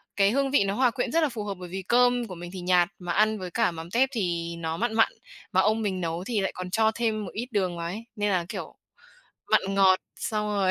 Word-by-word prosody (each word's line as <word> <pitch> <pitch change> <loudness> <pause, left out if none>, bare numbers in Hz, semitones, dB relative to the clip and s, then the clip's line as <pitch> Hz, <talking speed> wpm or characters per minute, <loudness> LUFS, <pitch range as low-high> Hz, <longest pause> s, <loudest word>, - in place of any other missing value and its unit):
cái 200 0 +4
hương 275 +1 +1
vị 285 - +4
nó 195 0 -1
hòa 250 0 +3
quyện 250 - -2
rất 330 0 +3
là 300 - +2
phù 225 -4 -5
hợp, 200 -1 -3
bởi 180 - -8
vì 190 +2 -4
cơm 245 +2 +3
của 185 - -7
mình 175 +1 -8
thì 185 - -5
nhạt, 180 0 +3
mà 175 -1 -4
ăn 215 +1 +2
với 180 -2 -6
cả 230 -6 +2
mắm 165 +1 -8
tép 265 +3 +3
thì 170 -7 -2
nó 160 0 -3
mặn 230 0 -1
mặn, 225 0 +4 0.4
mà 190 - +4
ông 215 +3 +2
mình 190 -3 -1
nấu 165 +1 -2
thì 225 0 -1
lại 195 - -1
còn 185 0 -5
cho 220 +1 +3
thêm 220 -3 -1
một 185 - -7
ít 240 +3 -4
đường 185 -4 0
vào 170 - -4
ấy, 210 +6 -5
nên 205 0 0
là, 180 -3 +1
kiểu, - - -6 0.8
mặn - - +5
ngọt 190 -1 +5 0.2
xong 210 -1 -2
rồi 200 -3 +1
200 Hz, 270 wpm, -26 LUFS, 180-225 Hz, 0.8 s, mặn